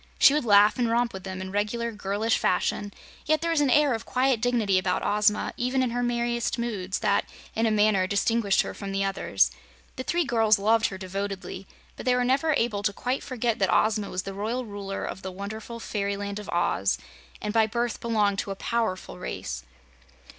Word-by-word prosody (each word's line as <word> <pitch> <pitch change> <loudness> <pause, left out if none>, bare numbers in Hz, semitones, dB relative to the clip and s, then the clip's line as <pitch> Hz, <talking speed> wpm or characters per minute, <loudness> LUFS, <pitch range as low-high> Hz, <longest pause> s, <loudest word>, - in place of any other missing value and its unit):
She 280 - +7
would 300 -4 0
laugh 210 +1 +5
and 240 -2 +2
romp 235 +1 +1
with 190 -1 -8
them 185 -1 -5
in 190 0 -6
regular 215 +4 -1
girlish 210 +2 0
fashion, 205 +2 0 0.4
yet 310 0 +3
there 335 0 0
was 325 -3 +2
an 285 - +3
air 290 0 +4
of 225 - -3
quiet 255 -2 +1
dignity 230 -6 +2
about 185 -1 -1
Ozma, 210 0 +2
even 260 +1 +1
in 250 - -1
her 245 +1 -1
merriest 240 -1 0
moods, 205 -6 -2
that, 205 -2 +1 0.3
in 225 +1 +2
a - - +3
manner, 210 -3 +3
distinguished 200 0 +2
her - - -6
from 195 -1 -6
the 195 0 0
others. 195 -1 +1 0.5
The 260 - -3
three 345 +5 +1
girls 225 -3 +3
loved 225 +3 +3
her 190 - -6
devotedly, 190 0 -5 0.3
but - - -7
they 250 - +4
were 250 - +2
never 275 +5 +2
able 230 -5 0
to 205 0 +1
quite 250 +6 -2
forget 240 -3 -2
that 190 -2 +2
Ozma 215 -2 +2
was 185 0 -3
the 195 - -6
Royal 225 +6 -2
Ruler 200 -2 -5
of - - -6
the 190 - -5
wonderful 215 +5 -7
Fairyland 200 -1 -3
of 210 - -9
Oz, 170 - +1 0.4
and 210 0 -3
by 225 -1 +4
birth 235 +1 -2
belonged 210 -4 +1
to - - -3
a 195 - -3
powerful 225 -3 -2
race. 65 +1 -5
215 Hz, 205 wpm, -26 LUFS, 195-240 Hz, 0.5 s, She